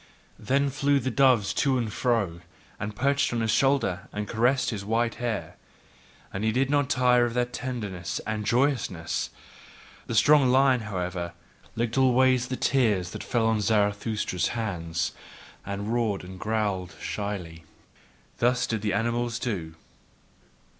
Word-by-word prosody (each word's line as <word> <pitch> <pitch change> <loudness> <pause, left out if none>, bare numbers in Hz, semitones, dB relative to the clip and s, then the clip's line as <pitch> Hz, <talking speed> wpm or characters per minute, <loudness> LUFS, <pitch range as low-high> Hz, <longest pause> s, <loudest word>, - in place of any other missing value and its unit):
Then 135 +4 +1
flew 140 +1 +2
the 130 0 -2
doves 115 -5 +3
to 135 -2 +2
and 115 -4 -2
fro, 100 -9 0 0.4
and 105 0 -4
perched 140 +5 +1
on 115 - 0
his 110 -1 +1
shoulder, 130 -9 +1
and 105 0 -4
caressed 125 +4 +1
his 100 -3 -4
white 115 +3 0
hair, 115 -4 -3 0.8
and 95 - -3
did 135 +2 +1
not 145 -2 +2
tire 125 -1 +4
of 120 0 -1
their 125 0 +2
tenderness 110 -9 -4
and 110 0 -2
joyousness. 120 - 0 0.8
The - - -3
strong 145 -3 +5
lion, 130 0 +4
however, 90 -5 -4 0.4
licked 120 +2 0
always 130 -1 +4
the 130 - -3
tears 105 -10 +1
that - - -6
fell 120 -3 0
on 110 -1 +2
Zarathustra's 105 -2 0
hands, 85 -7 -2 0.6
and 100 +2 -3
roared 110 -6 0
and 95 +1 -10
growled 100 -4 -2
shyly. 90 -6 -5 0.7
Thus 125 +1 +2
did 110 -2 -2
these 105 -2 -1
animals 120 +2 0
do. 90 -10 -4
115 Hz, 140 wpm, -26 LUFS, 100-125 Hz, 0.8 s, strong